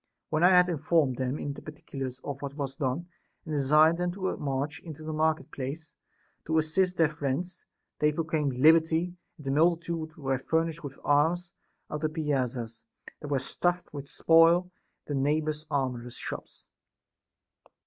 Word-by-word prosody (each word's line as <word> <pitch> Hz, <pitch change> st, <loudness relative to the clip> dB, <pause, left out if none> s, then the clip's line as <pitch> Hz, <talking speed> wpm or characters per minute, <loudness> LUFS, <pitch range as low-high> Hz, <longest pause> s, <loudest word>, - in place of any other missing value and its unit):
When 155 Hz, +1 st, +1 dB
I 180 Hz, -, +8 dB
had 180 Hz, -1 st, +6 dB
informed 155 Hz, -5 st, +1 dB
them 130 Hz, +2 st, -1 dB
in 145 Hz, -, -4 dB
the -, -, -10 dB
particulars 135 Hz, -4 st, -6 dB
of 140 Hz, -1 st, -5 dB
what 140 Hz, -1 st, -5 dB
was 140 Hz, -2 st, -4 dB
done, 140 Hz, +3 st, -2 dB, 0.4 s
and 155 Hz, -, -4 dB
desired 150 Hz, +3 st, +5 dB
them 180 Hz, 0 st, 0 dB
to 190 Hz, 0 st, -2 dB
march 140 Hz, +3 st, -2 dB
into 155 Hz, -2 st, -9 dB
the 155 Hz, 0 st, -4 dB
market 155 Hz, -2 st, 0 dB
place 140 Hz, +4 st, -6 dB, 0.5 s
to 160 Hz, +1 st, +1 dB
assist 180 Hz, +4 st, +1 dB
their 165 Hz, -, +5 dB
friends, 155 Hz, +4 st, -3 dB, 0.3 s
they 150 Hz, 0 st, +4 dB
proclaimed 155 Hz, -3 st, -1 dB
liberty; 160 Hz, +5 st, +4 dB, 0.2 s
and 150 Hz, -, -13 dB
the 135 Hz, -, 0 dB
multitude 165 Hz, +1 st, +1 dB
were 135 Hz, -3 st, -1 dB
furnished 165 Hz, +3 st, -1 dB
with 140 Hz, -2 st, -7 dB
arms 165 Hz, +5 st, +2 dB, 0.4 s
out 150 Hz, -, -1 dB
of -, -, -10 dB
the 155 Hz, -, +1 dB
piazzas, 130 Hz, -7 st, -2 dB, 0.4 s
that 150 Hz, -, -7 dB
were 145 Hz, -1 st, +1 dB
stuffed 175 Hz, +7 st, -1 dB
with 140 Hz, -1 st, -7 dB
spoil, 165 Hz, +2 st, +5 dB, 0.4 s
and 145 Hz, -, -1 dB
the -, -, +1 dB
neighboring 150 Hz, +2 st, +1 dB
armorers' 125 Hz, -4 st, -2 dB
shops. -, -, -7 dB
155 Hz, 165 wpm, -28 LUFS, 140-165 Hz, 0.5 s, I